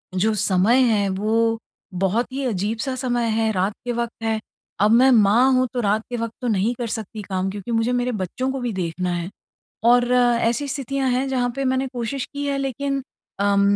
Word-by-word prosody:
जो 215 +4 +2
समय 205 +6 +4
है, 205 -2 +2
वो 225 +4 +1 0.4
बहुत 195 +7 0
ही 275 0 -2
अजीब-सा 225 +4 -2
समय 245 -2 -1
है, 220 0 +1
रात 195 +1 0
के 245 - -1
वक़्त 235 -1 -4
है। 220 -1 0 0.4
अब 210 +1 +4
मैं 250 +3 +6
माँ 230 +3 +5
हूँ, 255 0 +3
तो 250 - -1
रात 215 +1 +1
के 245 - -3
वक़्त 230 -1 -3
तो 250 - -2
नहीं 215 +1 +1
कर 240 - -2
सकती 220 0 -5
काम 190 0 -1
क्योंकि 200 +4 -6
मुझे 225 +1 +1
मेरे 245 0 0
बच्चों 255 +9 -3
को 270 - -3
भी 240 -2 -2
देखना 180 -1 -2
है। 170 +1 -4 0.6
और 245 0 +4
ऐसी 240 +2 +2
स्थितियाँ 275 -1 -2
हैं 255 +2 0
जहाँ 250 -2 0
पे 275 - -1
मैंने 260 +1 +1
कोशिश 245 +2 -3
की 285 0 -3
है 280 -1 -1
लेकिन 275 +1 -2 0.4
अम 200 0 +3
235 Hz, 200 wpm, -22 LUFS, 210-255 Hz, 0.6 s, मैं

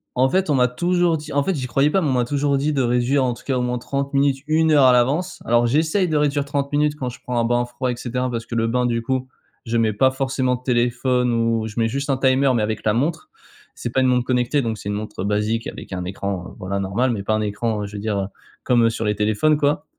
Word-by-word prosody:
en 130 +1 +3
fait, 190 +3 +1
on 145 - +3
m'a 125 -1 +4
toujours 175 +6 +1
dit 155 +1 -9
en 145 - +2
fait, 190 +4 -1
j'y 130 -3 -3
croyais 135 +4 +2
pas, 190 +5 +1
mais 155 - 0
on - - +1
m'a 125 -1 +1
toujours 140 +2 0
dit 150 +3 0
de 140 - +1
réduire 125 +3 +2
en 125 -1 0
tout - - -13
cas 135 -2 0
au - - 0
moins 125 0 -1
30 140 +3 -3
minutes, 140 -1 +1
1 160 +1 +3
heure 145 -3 +5
à 130 - +7
l'avance. 140 +10 +1
Alors, 120 +1 +3
j'essaye 160 - +1
de 155 - +1
réduire 145 -1 +1
30 140 0 -2
minutes 150 0 +2
quand 130 - -4
je 125 - -11
prends 125 -1 -2
un 115 - +1
bain 120 +1 +1
froid 120 +1 -4
et - - -3
cetera, 125 +1 -3
parce 115 -2 -4
que 115 - -6
le 115 0 +1
bain 125 +2 0
du 115 -1 0
coup, 130 +2 -2 0.4
je 115 0 -1
mets 110 -2 +2
pas 130 +6 +3
forcément 130 -1 0
de 125 - -11
téléphone 125 0 +1
ou 115 -1 +1
je 110 +1 -5
mets 115 - +2
juste 140 +5 -3
un 135 - +2
timer 130 +1 +3
mais 115 - +1
avec 110 +1 -3
la 105 - +3
montre. 150 +8 -1 0.5
C'est 120 - -5
pas 130 - +2
une 130 - +3
montre 125 -1 +2
connectée 125 +3 +1
donc 115 -3 -2
c'est 100 - -6
une 105 - -1
montre 105 -2 -5
basique 105 +3 -1
avec - - -8
un 90 -1 -3
écran, 95 -1 -5
voilà, 100 +2 -3
normal 100 +7 0
mais 105 -4 -3
pas 110 - 0
un 110 - 0
écran 105 0 -2
je 100 +1 -9
veux - - -4
dire, 105 -1 -1
heu, 95 - -2 0.4
comme 120 -2 +4
sur 115 0 -3
les 105 0 +1
téléphones, 110 +9 +2
quoi. 145 0 0
125 Hz, 280 wpm, -21 LUFS, 115-140 Hz, 0.5 s, à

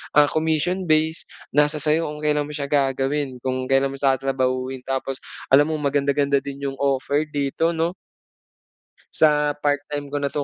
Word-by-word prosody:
ah, 145 -1 +5
commission 160 +4 0
based. 155 +1 +1 0.2
Nasa 150 +1 +3
sa'yo 155 +2 +1
kung 150 0 -7
kailan 150 -1 +1
mo 150 - -7
siya 140 -1 -4
gagawin, 135 0 0
kung 130 0 -2
kailan 135 0 +2
mo 135 - -8
tatrabahuhin. 130 -1 0
Tapos 135 0 -3 0.3
alam 145 +3 +6
mo 160 - -1
maganda-ganda 140 -1 +1
din 140 +1 -8
'yong 135 -1 -4
offer 140 +2 0
dito, 145 +4 -1
'no 165 +2 0 1.2
sa 150 -1 +3
part 145 -1 +2
time 145 -1 -4
ko 145 - -1
na 140 - +1
'to. 145 0 -2
145 Hz, 165 wpm, -22 LUFS, 135-150 Hz, 1.2 s, alam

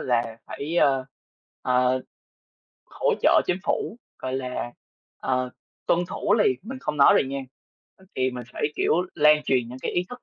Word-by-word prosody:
là 115 -2 0
phải, 155 +5 -4
ờ, 135 -5 +3 0.6
ờ, 125 0 +2 0.9
hỗ - - 0
trợ - - +6
chính 180 - +1
phủ, 230 - -1 0.2
gọi 130 0 -4
là, 125 -2 -3 0.5
ờ, 130 -1 -1 0.4
tuân 170 - +3
thủ 205 - 0
liền. 170 - +3
Mình 260 +5 -7
không 150 - -3
nói 140 - +7
liền 135 - +1
nha 140 - -3 0.8
thì 130 0 +1
mình 125 -1 -6
phải, - - -6
kiểu, - - +1 0.2
lan 150 0 +5
truyền 125 -3 +1
những 125 - -8
cái - - -3
ý 175 - +1
thức 245 -1 -9
130 Hz, 170 wpm, -25 LUFS, 125-155 Hz, 0.9 s, nói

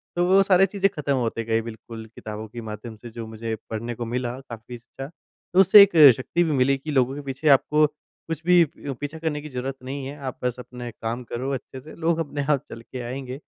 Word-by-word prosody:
तो 175 0 +2
वो 190 +2 +6
सारी 195 -1 +5
चीज़े 195 0 +1
ख़त्म 145 -5 -2
होते 115 -2 -1
गए 115 0 +1
बिल्कुल 115 0 -9
किताबों 110 0 -7
के 120 +2 -8
माध्यम 110 +2 -7
से 120 +3 -10
जो 115 0 -7
मुझे 110 0 -4
पढ़ने 115 +2 -4
को 120 - -4
मिला 125 +1 -3
काफ़ी 115 +1 -8
अच्छा, 130 +3 -9
तो 170 +3 -5
उससे 195 +2 +9
एक 200 - +3 0.3
शक्ति 170 +6 0
भी 165 - 0
मिली 135 -1 +3
कि 150 +3 -6
लोगों 130 -1 +2
के 145 - -6
पीछे 140 +2 -1
आपको 150 +3 +2
कुछ 155 +1 -9
भी 175 -1 +6
प 140 - -5
पीछा 145 +2 -4
करने 155 -2 -2
की 150 - -9
ज़रूरत 130 0 -4
नहीं 135 +1 -5
है। 140 +2 -7
आप 130 - -6
बस 125 -1 0
अपने 125 -1 -8
कम 115 +2 -3
करो 130 +3 -3
अच्छे 130 0 -6
से 150 +4 -12
लोग 165 0 0
अपने 145 -2 -2
आप 140 -2 +1
चल 115 - -9
के 125 +2 -8
आएँगे। 130 +1 -5
130 Hz, 230 wpm, -24 LUFS, 120-150 Hz, 0.3 s, उससे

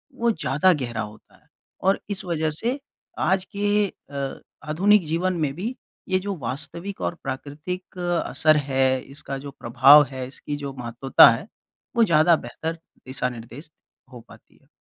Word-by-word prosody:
वो 235 -2 +2
ज़्यादा 165 - +2
गहरा 120 -7 -3
होता 105 +1 -10
है। - - -28 0.3
और 195 +1 +2
इस 200 -2 -3
वजह 160 -3 0
से 235 - -2 0.4
आज 190 0 +1
के 205 0 +2
अ, 140 -6 -7 0.3
आधुनिक 195 +4 +4
जीवन 175 +4 0
में 145 -3 0
भी 220 +9 -4 0.3
ये 185 0 +2
जो 200 +1 -4
वास्तविक 145 +10 -5
और - - -1
प्राकृतिक 150 +8 -6 0.3
असर 155 -1 +3
है, 130 -2 +1
इसका 135 0 -7
जो 140 +1 -8
प्रभाव 135 +5 +7
है, 130 -1 -5
इसकी 145 +2 -6
जो 140 -1 -6
महत्वता 120 +3 +6
है, 160 - -4 0.5
वो 235 - +5
ज़्यादा 170 -3 +5
बेहतर 160 +5 -5 0.3
दिशानिर्देश 125 +3 -5 0.4
हो 125 - -9
पाती - - -18
है। - - -30
150 Hz, 155 wpm, -24 LUFS, 130-185 Hz, 0.5 s, प्रभाव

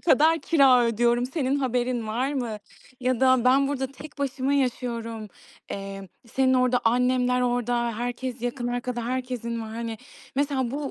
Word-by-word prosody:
kadar 320 +1 +4
kira 270 -7 +5
ödüyorum, 235 +1 +2
senin 270 0 -1
haberin 250 -3 -1
var 245 +6 -1
mı 240 -6 -3 0.4
ya 255 -1 0
da 260 -2 +4
ben 270 +2 +4
burada 270 -2 -1
tek 295 +3 -12
başıma 275 -1 -1
yaşıyorum, 235 -4 -2 0.4
emm, 195 0 -6 0.2
senin 260 +2 +2
orada 255 -1 +3
annemler 250 +1 +2
orada, 240 -2 0
herkes 245 0 -4
yakın 245 0 -2
arkada 245 -1 -3
herkesin 250 -2 -3
var. 220 - -6
Hani 230 -1 -4 0.4
mesela 275 -3 0
bu 280 +1 -3
250 Hz, 150 wpm, -25 LUFS, 235-265 Hz, 0.4 s, kira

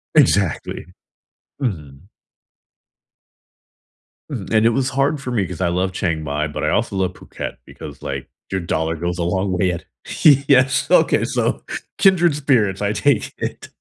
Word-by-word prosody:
Exactly. 100 - +2 0.8
Mhm. 80 - -4 2.2
Mhm, 110 -9 -5
and 110 0 +4
it - - +6
was 130 +3 0
hard 140 +2 +1
for 125 - -5
me 105 -6 +1
'cause 90 0 -7
I 85 - +2
love 90 +2 0
Chiang 80 -4 -2
Mai, 75 +1 -1
but 75 - -5
I - - +2
also 100 - 0
love 95 -1 0
Phuket - - -7
because, - - -10
like, - - -5 0.2
your 95 - -1
dollar 80 -1 -1
goes 85 +2 -3
a 85 - -1
long 95 +2 0
way 90 0 +1
at 85 0 -6 0.6
Yes, 130 -1 +3
okay, - - +4
so, - - -1 0.4
kindred 175 -4 +5
spirits, 120 -9 +1
I 100 +1 0
take 140 +6 +1
it. - - -5
95 Hz, 155 wpm, -20 LUFS, 85-130 Hz, 2.2 s, it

